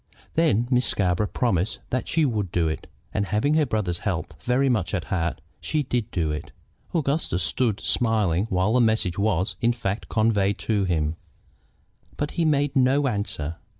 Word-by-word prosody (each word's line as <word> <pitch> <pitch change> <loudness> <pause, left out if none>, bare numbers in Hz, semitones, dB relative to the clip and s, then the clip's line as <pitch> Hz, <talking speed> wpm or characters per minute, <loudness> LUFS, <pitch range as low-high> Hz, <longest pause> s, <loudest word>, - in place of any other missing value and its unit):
Then 145 -8 +2
Miss 125 -1 +3
Scarborough 95 +1 +1
promised 105 -5 0
that 130 - -1
she 160 -2 +2
would 105 -8 -1
do 85 -2 +1
it, 80 - -4 0.3
and, 100 - 0
having 110 +9 +1
her 155 -2 +3
brother's 95 -7 -1
health 90 -4 -3
very 125 +6 +2
much 105 -7 +1
at 90 - -2
heart, 85 -3 -1 0.2
she 155 -1 -1
did 120 -4 -1
do 80 -6 -1
it. 75 0 -5 0.4
Augustus 140 - 0
stood 105 - 0
smiling 105 -6 +1
while 95 +2 +1
the 125 - +4
message 110 -5 +1
was, 100 -2 0
in 120 +1 +3
fact, 105 -3 -3
conveyed 105 -3 +2
to 105 -1 0
him, 80 -3 0 1.0
but 145 - -2
he 170 - 0
made 145 -2 +2
no 135 +2 +3
answer. 100 - -3
110 Hz, 170 wpm, -25 LUFS, 90-125 Hz, 1.0 s, the